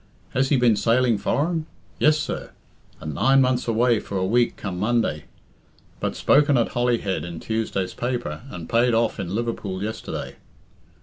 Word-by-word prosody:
Has 135 Hz, +1 st, +1 dB
he 140 Hz, -, +4 dB
been 120 Hz, -3 st, +4 dB
sailing 115 Hz, +1 st, +2 dB
foreign? 160 Hz, -, 0 dB, 0.3 s
Yes, 155 Hz, 0 st, +4 dB
sir; 155 Hz, -, -4 dB, 0.5 s
and 75 Hz, -1 st, -5 dB
nine 135 Hz, -, +4 dB
months 125 Hz, -2 st, +2 dB
away 115 Hz, 0 st, +3 dB
for 100 Hz, -, -5 dB
a 95 Hz, -, 0 dB
week 120 Hz, +4 st, +2 dB
come 90 Hz, -3 st, -5 dB
Monday. 110 Hz, -8 st, 0 dB, 0.7 s
But -, -, -2 dB
spoken 145 Hz, -1 st, +4 dB
at 115 Hz, -, +1 dB
Holyhead 120 Hz, -9 st, 0 dB
in 85 Hz, -1 st, -6 dB
Tuesday's 110 Hz, -4 st, -2 dB
paper, 120 Hz, -11 st, -3 dB
and 85 Hz, -9 st, -8 dB
paid 120 Hz, 0 st, +3 dB
off 115 Hz, -1 st, +1 dB
in 95 Hz, 0 st, -3 dB
Liverpool 105 Hz, -5 st, -3 dB
yesterday. 110 Hz, +1 st, -5 dB
115 Hz, 160 wpm, -23 LUFS, 100-125 Hz, 0.7 s, he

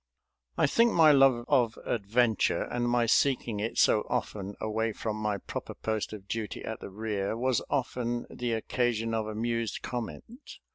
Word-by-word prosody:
I -, -, +4 dB
think 230 Hz, +10 st, +4 dB
my 160 Hz, -2 st, +7 dB
love 135 Hz, -4 st, +5 dB
of 120 Hz, -6 st, +2 dB
adventure, 115 Hz, +1 st, +1 dB
and 120 Hz, 0 st, -2 dB
my 120 Hz, -1 st, +2 dB
seeking 120 Hz, -3 st, +2 dB
it 110 Hz, +2 st, -3 dB
so 105 Hz, -, +4 dB
often 100 Hz, -1 st, -3 dB
away 110 Hz, +1 st, -1 dB
from 110 Hz, 0 st, -3 dB
my 105 Hz, -1 st, -1 dB
proper -, -, -7 dB
post 110 Hz, -1 st, -2 dB
of 100 Hz, -2 st, -9 dB
duty 110 Hz, -4 st, -4 dB
at -, -, -5 dB
the -, -, -8 dB
rear, 105 Hz, 0 st, -3 dB
was 130 Hz, 0 st, +1 dB
often 120 Hz, -3 st, -1 dB
the 120 Hz, -1 st, -3 dB
occasion 115 Hz, 0 st, -1 dB
of 110 Hz, -1 st, -1 dB
amused 115 Hz, +1 st, -2 dB
comment. 130 Hz, -, -7 dB
115 Hz, 160 wpm, -29 LUFS, 110-125 Hz, -, my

